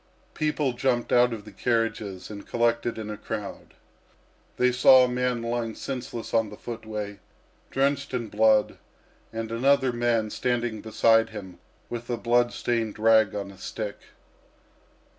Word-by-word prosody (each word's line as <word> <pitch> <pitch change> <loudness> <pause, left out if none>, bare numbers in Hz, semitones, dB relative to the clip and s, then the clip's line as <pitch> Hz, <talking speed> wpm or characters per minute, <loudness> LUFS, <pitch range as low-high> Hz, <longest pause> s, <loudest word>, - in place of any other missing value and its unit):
People 150 -3 0
jumped 120 -1 0
out 120 0 +5
of 110 -3 -6
the 105 - -11
carriages 110 -3 -2
and 100 -1 -9
collected 115 0 0
in 110 -1 -5
a 105 - -6
crowd. - - -7 0.8
They 125 0 +3
saw 130 +1 +7
a - - +3
man 125 -1 -1
lying 115 -1 -2
senseless 125 -3 -6
on 115 -2 +2
the 105 - -10
footway, 110 -3 -6 0.5
drenched 140 +1 0
in 120 -3 -2
blood, 110 0 +3 0.5
and 115 0 -5
another 130 +2 +3
man 120 -2 0
standing 120 -3 -1
beside 115 0 +3
him 95 -4 -9 0.3
with 120 0 -6
a 120 - -1
blood 120 +1 +2
stained 115 -3 -2
rag 110 -1 +4
on 100 -1 -4
a 95 - -16
stick. 105 +1 -5
115 Hz, 145 wpm, -26 LUFS, 110-125 Hz, 0.8 s, saw